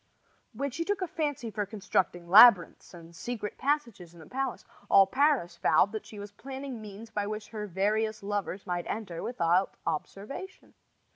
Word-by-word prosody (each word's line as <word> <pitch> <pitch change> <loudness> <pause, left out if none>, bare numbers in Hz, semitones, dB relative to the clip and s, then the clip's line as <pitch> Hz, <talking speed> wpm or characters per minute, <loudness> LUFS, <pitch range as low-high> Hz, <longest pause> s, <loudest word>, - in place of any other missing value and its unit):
When 280 0 -3
she 335 - -3
took 395 +1 -1
a - - -2
fancy 290 -8 -3
for 210 0 -2
constructing 185 -4 -1
labyrinths 195 -2 +7
and 170 -1 -13
secret 220 0 -5
passages 235 - -2
in - - -14
the 160 - -12
palace, 265 - -4 0.2
all 195 - +7
Paris 255 - +1
vowed 155 +6 +3
that 220 - -6
she 215 - -11
was 205 0 -8
planning 265 +1 -7
means 215 +2 -10
by 205 -1 -2
which 215 0 -5
her 210 -2 -5
various 215 +3 0
lovers 200 -1 -3
might 175 -2 -3
enter 200 -6 -4
without 180 -5 +1
observation. 200 - -6
210 Hz, 165 wpm, -29 LUFS, 185-245 Hz, 0.2 s, labyrinths